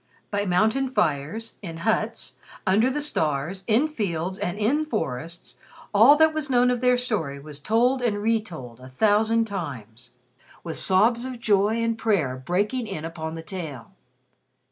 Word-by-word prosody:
By 205 0 -1
mountain 220 +9 +2
fires, 175 - -2
in 165 -5 -7
huts, 220 0 -1 0.3
under 215 +7 +3
the 290 +2 -2
stars, 160 - -1
in 235 +7 +3
fields 190 - -3
and 175 +2 -2
in 250 +9 +1
forests, 165 - -5 0.4
all 225 +8 +8
that 315 +1 +4
was 310 -2 -2
known 250 -1 +4
of 245 -1 -1
their 250 -1 +4
story 205 - -1
was 145 0 -8
told 245 - +2
and 230 -4 0
retold 205 - -2
a 130 0 -12
thousand 220 - +2
times, 125 - -7 0.5
with 165 -2 -4
sobs 225 +6 +3
of 255 -2 -6
joy 215 +1 +2
and 230 -1 -1
prayer 180 - +1
breaking 205 - -1
in 160 -6 -5
upon 160 -1 -5
the 165 - -7
tale. 160 - -7
205 Hz, 155 wpm, -24 LUFS, 160-235 Hz, 0.5 s, all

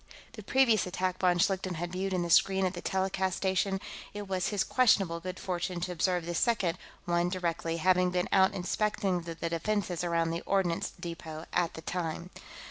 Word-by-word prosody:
The - - -8
previous 245 -7 +3
attack 185 0 -2
von 180 -1 +3
Schlichten 185 0 +1
had 175 +2 -4
viewed 190 +1 -2
in 180 -2 0
the 170 - -3
screen 190 +1 +4
at 185 - 0
the 175 - -6
telecast 190 -1 0
station; 190 0 0 0.4
it 205 -1 -5
was 185 -2 -1
his 205 -2 +1
questionable 195 -9 +3
good 185 +1 -6
fortune 180 -1 -2
to 180 +1 -2
observe 180 0 0
the 175 - -3
second 185 -3 +1 0.3
one 175 0 +1
directly, 170 -2 -2
having 180 +1 +3
been 180 +1 0
out 190 0 +4
inspecting 190 -1 0
the 165 0 -7
defenses 170 +2 -1
around 165 -1 +1
the 165 +1 -3
ordnance 190 -4 0
depot 165 -2 -7
at 175 -2 +1
the 160 - -7
time. 170 +1 -3
180 Hz, 185 wpm, -30 LUFS, 170-190 Hz, 0.4 s, screen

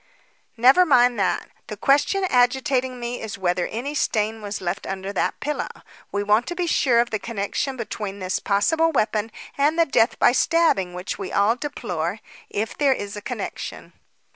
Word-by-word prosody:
"Never 260 +10 +6
mind 245 -7 +4
that. 180 -3 -1 0.2
The 210 - -7
question 290 - +2
agitating 255 -3 +1
me 240 +1 -4
is 220 -2 -6
whether 180 -2 0
any 255 +6 -4
stain 220 -6 0
was 205 -1 -4
left 175 -1 -4
under 195 +1 -4
that - - -1
pillow. 300 +1 -3 0.4
We 200 0 -1
want 210 +4 +2
to 350 - -4
be 355 0 -1
sure 255 -7 +3
of 240 - -3
the 215 - -1
connection 230 +5 -3
between 210 -4 -5
this 185 -1 -2
possible 320 +12 +2
weapon 220 -5 0 0.3
and 295 +3 +3
the 335 - +5
death 235 -5 +2
by - - +5
stabbing 255 - +2
which 180 +1 -5
we - - -5
all 205 +3 +3
deplore 205 - -3 0.3
if 220 +2 -3
there 280 -2 +3
is 205 -5 -6
a 205 - -6
connection." - - -6
230 Hz, 175 wpm, -23 LUFS, 200-275 Hz, 0.4 s, Never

